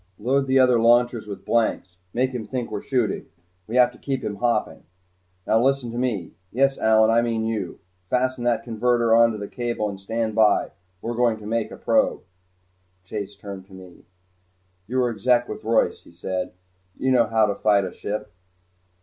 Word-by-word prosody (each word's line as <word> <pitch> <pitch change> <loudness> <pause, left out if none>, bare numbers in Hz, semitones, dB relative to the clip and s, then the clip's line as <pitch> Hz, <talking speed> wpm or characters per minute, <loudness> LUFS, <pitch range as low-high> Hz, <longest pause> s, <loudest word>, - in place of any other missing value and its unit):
Load 135 +5 +1
the 130 0 +3
other 125 -2 +5
launchers 120 -1 +3
with 100 - -8
blanks. 105 -6 0
Make 130 +4 0
him 120 -4 -5
think 125 -1 -4
we're - - -3
shooting. 125 -7 -1 0.4
We 115 - -5
have 125 -1 +5
to - - -18
keep 135 -2 -3
him 105 -1 -4
hopping. 120 +2 0 0.6
Now 115 +1 +3
listen 135 -3 +1
to 120 - -6
me 115 -9 -2 0.2
Yes, 135 +2 +2
Allyn, 110 0 +4
I 115 +1 +4
mean 115 -1 -1
you. 110 -5 -3 0.3
Fasten 125 0 0
that 120 -1 +1
converter 120 0 +1
onto 115 -1 +4
the 100 -1 -6
cable 120 -3 -2
and 100 -1 -8
stand 110 +2 -2
by. 105 -1 +3 0.3
We're 120 - -2
going 120 -2 +2
to 105 - -12
make 115 +1 -1
a - - -10
probe." - - +1 0.8
Chase 100 +1 -6
turned 100 -2 -9
to 95 - -17
me. 95 -2 -14 0.8
"You 125 +4 -2
were 125 -2 +2
Exec 120 +3 +2
with - - -7
Royce," 115 +1 +1
he - - -18
said. 90 +2 -4 0.4
"You 130 - 0
should 130 - +5
know 115 -2 +4
how 110 0 +3
to 105 - 0
fight 100 -1 +2
a 90 - -5
ship." 105 0 -5
115 Hz, 190 wpm, -23 LUFS, 105-125 Hz, 0.8 s, other